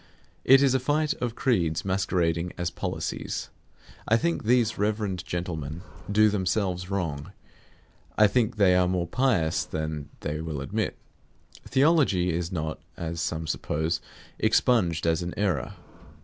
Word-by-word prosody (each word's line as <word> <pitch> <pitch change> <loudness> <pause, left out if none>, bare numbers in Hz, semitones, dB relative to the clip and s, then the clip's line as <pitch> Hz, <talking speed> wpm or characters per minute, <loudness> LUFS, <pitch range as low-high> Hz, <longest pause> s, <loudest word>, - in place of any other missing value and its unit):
It 135 +1 +7
is 135 -2 +4
a 130 - +3
fight 150 +4 +1
of 120 -2 -2
creeds 85 - +1
masquerading 90 -3 0
as 90 -1 -2
policies. - - -4 0.6
I 115 - +4
think 170 +7 -1
these 120 -1 +2
reverend 105 -3 -1
gentlemen 85 -2 -4 0.3
do 105 +1 +5
themselves 95 -2 -1
wrong; 80 -8 -3 0.8
I 105 - +7
think 115 +2 +2
they 100 -4 +4
are 90 0 +4
more 90 -1 0
pious 90 -6 +1
than 80 -2 -4
they 75 +1 -3
will 80 -3 -4
admit. 70 - -2 0.7
Theology 130 - +3
is 85 +1 -2
not 80 -3 -3 0.2
(as 85 0 -4
some 80 -1 -2
suppose) 80 +2 -1 0.4
expunged 90 -11 +2
as 80 0 +2
an 90 0 -4
error. 85 -11 -1
90 Hz, 135 wpm, -26 LUFS, 80-110 Hz, 0.8 s, It